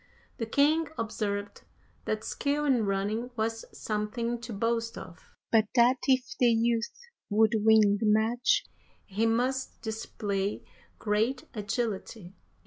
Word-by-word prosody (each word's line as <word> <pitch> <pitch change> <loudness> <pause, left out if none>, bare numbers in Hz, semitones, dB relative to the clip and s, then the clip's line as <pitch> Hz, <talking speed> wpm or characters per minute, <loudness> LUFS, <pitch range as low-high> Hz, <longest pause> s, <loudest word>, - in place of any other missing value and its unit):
The 225 - -3
king 300 +6 +3
observed 205 -2 -3 0.4
that 215 0 -2
skill 290 +4 -1
in 245 -7 +2
running 205 +5 -1
was 225 0 -2
something 230 +3 -3
to 235 0 -7
boast 230 +2 -1
of, 175 -3 -11 0.2
but 220 -1 +5
that 245 +2 +5
if 260 -1 +4 0.2
the 245 - +5
youth 230 0 +2 0.4
would 215 +1 +3
win 215 -2 +5
the 220 - 0
match 220 +4 +2 0.4
he 215 +3 0
must 255 +4 -1
display 210 -3 -3 0.3
great 225 +5 0
agility. 210 -3 -4
225 Hz, 125 wpm, -29 LUFS, 210-240 Hz, 0.4 s, but